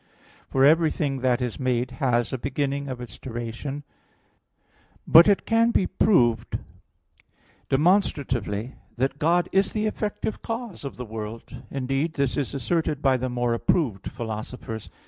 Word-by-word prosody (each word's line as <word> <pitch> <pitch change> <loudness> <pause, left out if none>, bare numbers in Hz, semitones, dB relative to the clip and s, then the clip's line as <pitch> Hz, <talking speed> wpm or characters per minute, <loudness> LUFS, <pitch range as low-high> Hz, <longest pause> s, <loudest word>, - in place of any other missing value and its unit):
For 135 0 +4
everything 155 -3 +3
that 125 -1 +1
is 120 -3 -4
made 125 -1 0
has 120 -3 +1
a 130 - -2
beginning 140 +1 -2
of 130 -2 -5
its 120 -5 -9
duration. 120 +4 -5 1.2
But 165 +4 +8
it 200 -1 +3
can 230 +1 +3
be 200 - +2
proved 120 - +2 1.1
demonstratively 135 - +1 0.2
that 135 +3 -1
God 170 +3 +3
is 195 +1 +2
the 215 0 0
effective 215 0 -3
cause 230 -5 -5
of 140 - -6
the 125 - -5
world; 110 +2 -7
indeed 135 +4 -1
this 140 -5 0
is 140 0 -2
asserted 150 +2 -1
by 135 -2 +4
the 130 0 -2
more 120 -1 0
approved 115 - 0
philosophers. 110 0 -6
135 Hz, 140 wpm, -25 LUFS, 120-160 Hz, 1.2 s, But